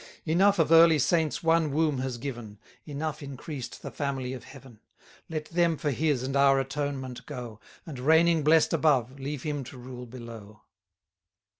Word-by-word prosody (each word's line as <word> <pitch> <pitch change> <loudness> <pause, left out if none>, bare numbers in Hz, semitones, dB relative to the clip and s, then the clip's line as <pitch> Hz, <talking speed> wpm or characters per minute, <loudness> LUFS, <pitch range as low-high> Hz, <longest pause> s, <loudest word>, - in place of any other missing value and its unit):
Enough 190 +5 +3
of 165 -1 +2
early 165 -1 +7
saints 160 +3 +1
one 165 -1 +3
womb 150 -1 +1
has 130 -2 -3
given; 120 -5 -7 0.3
Enough 150 +1 -4
increased 135 -2 -7
the - - -6
family 135 -3 -3
of 125 -3 -9
Heaven: 135 -5 -14 0.5
Let 155 -2 -4
them 170 -2 +2
for 145 - -1
his 140 -1 0
and 135 +1 -3
our 140 0 +5
atonement 135 -2 -4
go; 120 -6 -7 0.3
And, 145 -6 -8
reigning 160 +4 +4
blest 155 +1 +4
above, 135 -4 +1
leave 140 0 -5
him 145 -3 -3
to 130 - -11
rule 125 0 -9
below. 115 -4 -11
140 Hz, 160 wpm, -27 LUFS, 125-155 Hz, 0.5 s, early